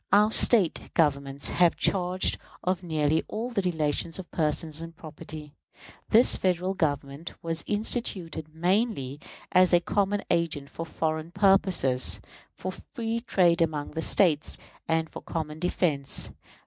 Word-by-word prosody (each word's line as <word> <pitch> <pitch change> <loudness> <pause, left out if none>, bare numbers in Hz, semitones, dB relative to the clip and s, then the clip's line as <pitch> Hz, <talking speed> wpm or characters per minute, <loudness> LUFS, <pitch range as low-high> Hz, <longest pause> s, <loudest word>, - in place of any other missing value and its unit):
Our 210 +2 +5
State 215 -6 +4
governments 140 -3 0
have 175 -2 +3
charge 185 -1 0 0.2
of 185 -1 0
nearly 155 -2 0
all 230 +4 -4
the 205 - 0
relations 160 -2 -1
of 190 -2 -9
person 155 0 0
and 165 0 -10
property. 155 -1 -9 0.6
This 230 +3 +5
Federal 185 0 0
Government 145 -2 -3
was 165 -1 -1
instituted 190 -7 -2
mainly 175 - -1 0.3
as 185 0 +4
a 175 - +7
common 200 +3 0
agent 160 -5 -1
for 165 - -6
foreign 160 0 -2
purposes, 190 -9 +3 0.4
for 185 - -5
free 225 +4 -5
trade 175 -8 +2
among 155 -3 -1
the 160 - -4
States, 160 -4 +3 0.3
and 160 0 +1
for - - -10
common 155 -1 -5
defense. 160 -5 0
170 Hz, 135 wpm, -27 LUFS, 155-190 Hz, 0.6 s, a